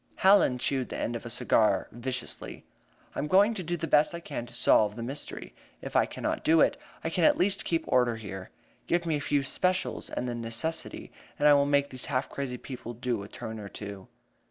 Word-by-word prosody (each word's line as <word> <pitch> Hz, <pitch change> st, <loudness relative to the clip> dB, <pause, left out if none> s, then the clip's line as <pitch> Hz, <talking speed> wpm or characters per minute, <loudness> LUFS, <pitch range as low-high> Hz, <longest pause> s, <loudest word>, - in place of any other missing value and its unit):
Hallen 190 Hz, -9 st, +5 dB
chewed 130 Hz, 0 st, -1 dB
the -, -, -5 dB
end 120 Hz, -, -2 dB
of 115 Hz, 0 st, -6 dB
a -, -, -6 dB
cigar 110 Hz, -1 st, +2 dB
viciously. 125 Hz, +1 st, -5 dB, 0.5 s
"I -, -, -4 dB
am 150 Hz, -, -1 dB
going 200 Hz, +7 st, +5 dB
to 205 Hz, -, -4 dB
do 175 Hz, 0 st, -2 dB
the 165 Hz, -, -3 dB
best 155 Hz, +1 st, +3 dB
I -, -, -5 dB
can 140 Hz, -7 st, -6 dB
to -, -, -11 dB
solve 105 Hz, -1 st, +4 dB
the 115 Hz, -, -5 dB
mystery; 135 Hz, +5 st, -5 dB, 0.3 s
if -, -, -8 dB
I -, -, +4 dB
cannot -, -, -3 dB
do 160 Hz, +1 st, +4 dB
that, -, -, +2 dB, 0.3 s
I 165 Hz, -, -2 dB
can 175 Hz, -, 0 dB
at -, -, +5 dB
least 195 Hz, +2 st, +2 dB
keep 165 Hz, -1 st, 0 dB
order 125 Hz, -2 st, +2 dB
here. 95 Hz, -4 st, -7 dB, 0.4 s
Give 175 Hz, 0 st, +1 dB
me 160 Hz, -2 st, +1 dB
a 145 Hz, -, -2 dB
few 140 Hz, 0 st, +1 dB
'specials' 185 Hz, +7 st, -1 dB
and 125 Hz, -, -3 dB
the 120 Hz, -, -2 dB
necessity, 120 Hz, +8 st, -3 dB, 0.3 s
and 145 Hz, -, +4 dB
I 145 Hz, -, +8 dB
will 140 Hz, 0 st, +4 dB
make 140 Hz, 0 st, +2 dB
these 130 Hz, -1 st, -6 dB
half 130 Hz, -1 st, -1 dB
crazy 135 Hz, -3 st, -4 dB
people 120 Hz, -2 st, -8 dB
do 120 Hz, -2 st, -2 dB
a 100 Hz, -, -8 dB
turn 110 Hz, +1 st, -7 dB
or 100 Hz, -1 st, -7 dB
two." 100 Hz, -2 st, -8 dB
135 Hz, 225 wpm, -29 LUFS, 115-160 Hz, 0.5 s, I